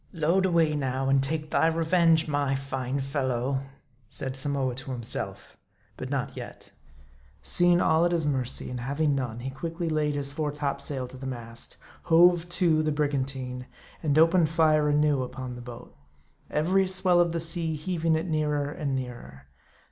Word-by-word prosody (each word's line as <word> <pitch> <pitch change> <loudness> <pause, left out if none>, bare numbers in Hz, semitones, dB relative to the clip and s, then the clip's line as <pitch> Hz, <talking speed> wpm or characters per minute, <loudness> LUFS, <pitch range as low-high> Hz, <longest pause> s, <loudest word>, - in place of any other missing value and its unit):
"Load 175 +3 +2
away 165 -4 +2
now, 135 -1 -1
and 135 0 +4
take 155 +2 -3
thy 160 - +3
revenge, 165 0 +3
my 145 -2 0
fine 135 0 -3
fellow," 135 -1 -1 0.5
said 130 +4 -4
Samoa 135 -1 0
to 135 +2 -8
himself. 120 -3 -5 0.4
But - - -6
not - - -2
yet. - - -9 0.7
Seeing 175 0 +4
all 160 -1 +3
at 175 - +1
his 165 -3 +1
mercy, 130 -4 -2
and 125 - -4
having 140 +4 0
none, 120 -4 -3
he 135 +2 -4
quickly 165 +4 -4
laid 150 -2 0
his 140 -1 -1
fore 150 0 -2
topsail 140 -2 -2
to 130 - -10
the 135 +1 -6
mast; 115 -2 -5
" - - -23
hove 175 +1 +5
to" 170 -3 +2
the 155 0 0
briganiine; 135 -3 -2 0.3
and 150 -2 +1
opened 165 0 +5
fire 155 -2 +3
anew 145 -2 +2
upon 130 0 -6
the 120 - -8
boat; 120 -1 -11 0.5
every 185 +5 +2
swell 185 -1 +3
of 170 -1 +3
the 165 - -2
sea 165 -1 -1
heaving 165 0 0
it 160 +2 -1
nearer 150 -3 0
and 145 -4 -2
nearer. 120 - -7
150 Hz, 170 wpm, -27 LUFS, 130-165 Hz, 0.7 s, hove